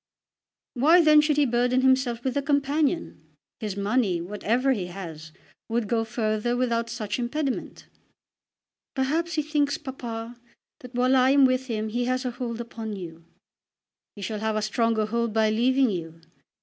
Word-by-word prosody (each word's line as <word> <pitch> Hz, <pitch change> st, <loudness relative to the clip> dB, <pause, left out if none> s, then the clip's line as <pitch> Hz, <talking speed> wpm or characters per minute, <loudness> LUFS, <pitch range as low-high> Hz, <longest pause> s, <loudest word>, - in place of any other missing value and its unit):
"Why 320 Hz, +7 st, +5 dB
then 305 Hz, -1 st, +7 dB
should 300 Hz, -1 st, +1 dB
he 295 Hz, -, +4 dB
burden 245 Hz, +1 st, +2 dB
himself 260 Hz, -3 st, +2 dB
with 260 Hz, 0 st, -1 dB
a 285 Hz, -, +1 dB
companion? 290 Hz, +3 st, 0 dB, 0.4 s
His 210 Hz, -3 st, -4 dB
money, 200 Hz, -3 st, +1 dB
whatever 210 Hz, +8 st, 0 dB
he 200 Hz, -8 st, -1 dB
has, 165 Hz, -4 st, -8 dB, 0.4 s
would 230 Hz, -1 st, -1 dB
go 225 Hz, +1 st, +1 dB
further 220 Hz, +1 st, -1 dB
without 235 Hz, -2 st, 0 dB
such 215 Hz, 0 st, -4 dB
impediment." 265 Hz, +2 st, -3 dB, 1.1 s
"Perhaps 315 Hz, +6 st, 0 dB
he 305 Hz, -, +1 dB
thinks, 295 Hz, -1 st, 0 dB
papa, 235 Hz, -3 st, -7 dB, 0.4 s
that 250 Hz, -1 st, -12 dB
while 255 Hz, +2 st, +3 dB
I 255 Hz, 0 st, +5 dB
am 275 Hz, 0 st, +6 dB
with 255 Hz, 0 st, +1 dB
him 220 Hz, -2 st, -2 dB
he 240 Hz, +3 st, -1 dB
has 255 Hz, +1 st, -1 dB
a 250 Hz, -, -1 dB
hold 240 Hz, -1 st, -5 dB
upon 225 Hz, -2 st, -6 dB
you." 170 Hz, -3 st, -9 dB, 0.9 s
"He 205 Hz, -, -8 dB
shall 210 Hz, +3 st, -3 dB
have 220 Hz, 0 st, -1 dB
a 215 Hz, -, -1 dB
stronger 220 Hz, 0 st, +1 dB
hold 235 Hz, 0 st, -1 dB
by 220 Hz, -1 st, +3 dB
leaving 255 Hz, +2 st, +3 dB
you. 165 Hz, -3 st, -6 dB
240 Hz, 160 wpm, -25 LUFS, 215-265 Hz, 1.1 s, then